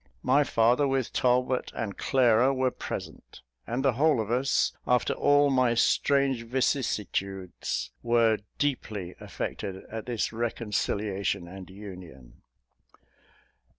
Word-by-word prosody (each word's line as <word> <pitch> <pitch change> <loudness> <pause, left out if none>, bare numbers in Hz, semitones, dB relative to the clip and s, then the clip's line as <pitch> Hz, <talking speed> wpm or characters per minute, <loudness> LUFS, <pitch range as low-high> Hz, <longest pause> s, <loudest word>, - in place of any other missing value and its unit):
My 140 +3 +4
father, 120 +2 +3
with 135 -2 -1
Talbot 125 0 +1
and 100 -3 -4
Clara, 130 0 +3
were 130 -1 +1
present; - - -8 0.3
and 125 +4 -2
the 135 - +5
whole 150 +2 +3
of 110 0 -2
us, 130 +3 +1
after 125 0 +2
all 145 0 +3
my 130 -3 +3
strange 135 +1 +2
vicissitudes, 105 -6 -2
were 115 -2 +3 0.2
deeply 110 -10 -2
affected 95 -1 -5
at 110 0 -6
this 115 -2 -2
reconciliation 105 -4 -2
and 95 +1 -10
union. 90 -10 -11
120 Hz, 115 wpm, -27 LUFS, 100-130 Hz, 0.3 s, the